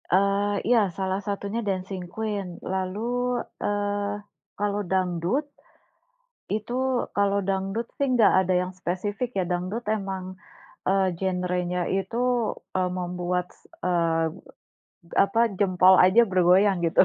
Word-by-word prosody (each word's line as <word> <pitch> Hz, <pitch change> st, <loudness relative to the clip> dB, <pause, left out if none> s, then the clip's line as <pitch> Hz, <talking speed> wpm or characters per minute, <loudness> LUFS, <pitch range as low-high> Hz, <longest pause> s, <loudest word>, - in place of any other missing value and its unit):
Eee, 200 Hz, +2 st, +2 dB
iya, 240 Hz, 0 st, +5 dB, 0.2 s
salah 190 Hz, 0 st, -1 dB
satunya 200 Hz, +2 st, -2 dB
Dancing 190 Hz, -1 st, -3 dB
Queen. 210 Hz, -3 st, -3 dB, 0.3 s
Lalu, 190 Hz, +1 st, -2 dB, 0.6 s
eee, 205 Hz, 0 st, -1 dB, 0.4 s
kalau 205 Hz, 0 st, 0 dB
dangdut, 185 Hz, -, 0 dB, 1.1 s
itu 215 Hz, +3 st, -2 dB, 0.4 s
kalau 200 Hz, 0 st, +2 dB
dangdut 195 Hz, +4 st, -1 dB
sih, 280 Hz, -, +1 dB
enggak 235 Hz, -5 st, +5 dB
ada 185 Hz, 0 st, 0 dB
yang 180 Hz, 0 st, -4 dB
spesifik 205 Hz, +7 st, -2 dB
ya, 190 Hz, -, +2 dB
dangdut 185 Hz, +6 st, -2 dB
emang, 190 Hz, -3 st, -3 dB, 0.5 s
eee, 195 Hz, 0 st, +3 dB
genrenya 180 Hz, -1 st, -1 dB, 0.2 s
itu, 195 Hz, +4 st, -3 dB, 0.6 s
eee, 185 Hz, -1 st, +1 dB
membuat 180 Hz, 0 st, -2 dB
s -, -, -26 dB, 0.3 s
eee, 165 Hz, -2 st, +2 dB, 1.0 s
apa, 200 Hz, +3 st, 0 dB, 0.2 s
jempol 185 Hz, -1 st, +5 dB
aja 185 Hz, +6 st, +6 dB
bergoyang, 185 Hz, +2 st, +4 dB
gitu. 165 Hz, -, +4 dB
190 Hz, 115 wpm, -25 LUFS, 180-205 Hz, 1.1 s, aja